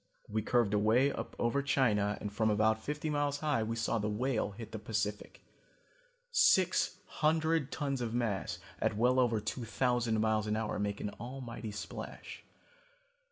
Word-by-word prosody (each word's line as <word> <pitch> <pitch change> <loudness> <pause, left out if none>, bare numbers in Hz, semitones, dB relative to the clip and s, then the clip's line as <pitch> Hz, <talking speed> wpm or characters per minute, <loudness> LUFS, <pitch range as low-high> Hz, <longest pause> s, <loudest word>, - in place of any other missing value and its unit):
We 110 +1 -1
curved 115 -1 +2
away 110 +7 +4
up - - -6
over 120 +4 +1
China 115 -7 +2
and 105 -1 -5
from 110 +1 +2
about 110 +1 +2
fifty 150 +3 -3
miles 145 -1 0
high 150 -6 +1
we 110 +1 -2
saw 115 0 0
the 105 0 -1
Whale 115 +1 0
hit 110 +2 -9
the 110 - -5
Pacific. 105 -1 -3 0.9
Six - - +4
hundred 160 -1 +1
tons 140 -4 -2
of 115 -2 -2
mass 115 -5 -1 0.2
at 105 - 0
well 125 +3 +4
over 120 -3 +3
two 110 +4 -4
thousand 120 -1 +1
miles 110 -1 +1
an 105 - 0
hour 110 -2 -2
make 105 0 -2
an 105 - -3
almighty 120 -1 -6
splash. 105 0 -7
115 Hz, 160 wpm, -33 LUFS, 105-135 Hz, 0.9 s, away